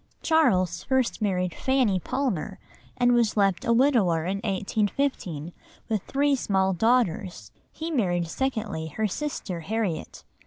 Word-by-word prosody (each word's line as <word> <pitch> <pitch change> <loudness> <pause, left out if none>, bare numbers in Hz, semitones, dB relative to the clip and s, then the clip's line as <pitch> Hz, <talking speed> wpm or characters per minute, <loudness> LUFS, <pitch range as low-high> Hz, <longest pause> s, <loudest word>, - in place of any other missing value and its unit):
Charles 185 - +2 0.3
married 180 -4 0
first - - -14
Fanny 255 -8 +2
Palmer, 210 - -2 0.4
and 245 0 +4
was 235 -3 +2
left 195 -3 +2
a - - +1
widower 230 - +3
in 190 +2 -1
1815 200 - -2 0.4
with 215 -3 0
three 285 +1 +2
small 190 -6 +1
daughters. 185 - 0 0.2
He 325 +1 -5
married 175 - 0
secondly 220 -6 -2
her 220 - 0
sister 205 - -4
Harriet. 190 -2 -3
205 Hz, 125 wpm, -26 LUFS, 180-250 Hz, 0.4 s, and